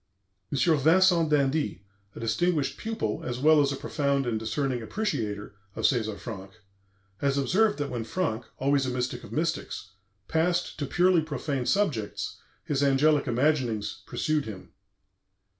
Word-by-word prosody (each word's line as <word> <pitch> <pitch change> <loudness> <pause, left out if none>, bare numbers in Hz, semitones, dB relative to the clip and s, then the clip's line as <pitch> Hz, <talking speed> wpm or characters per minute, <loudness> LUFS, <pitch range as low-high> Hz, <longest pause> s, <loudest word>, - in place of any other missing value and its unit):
M. 140 - -1 0.2
Vincent 170 +2 +4
d'Indy, 145 - +1 0.3
a - - -8
distinguished 140 +4 0
pupil, 220 - -2
as 125 0 -3
well 150 +3 +5
as 140 -1 +2
a - - -2
profound 140 0 0
and 115 -2 -1
discerning 130 +2 -1
appreciator, 110 - -3 0.2
of - - -5
César 110 -5 +1
Franck, 95 -2 -8 0.6
has 140 +4 0
observed 205 +10 +2
that 145 -1 -3
when 120 -2 -3
Franck 120 -5 -2
(always 140 0 +2
a - - 0
mystic 125 0 -3
of - - -11
mystics) 160 - -2 0.4
passed 170 +1 0
to 145 - -2
purely 180 +2 +4
profane 140 -4 -3
subjects 150 - -1 0.3
his 140 -1 -1
angelic 145 +2 +3
imaginings 120 -6 0
pursued 155 -2 0
him. 100 -4 -9
140 Hz, 140 wpm, -27 LUFS, 120-155 Hz, 0.6 s, well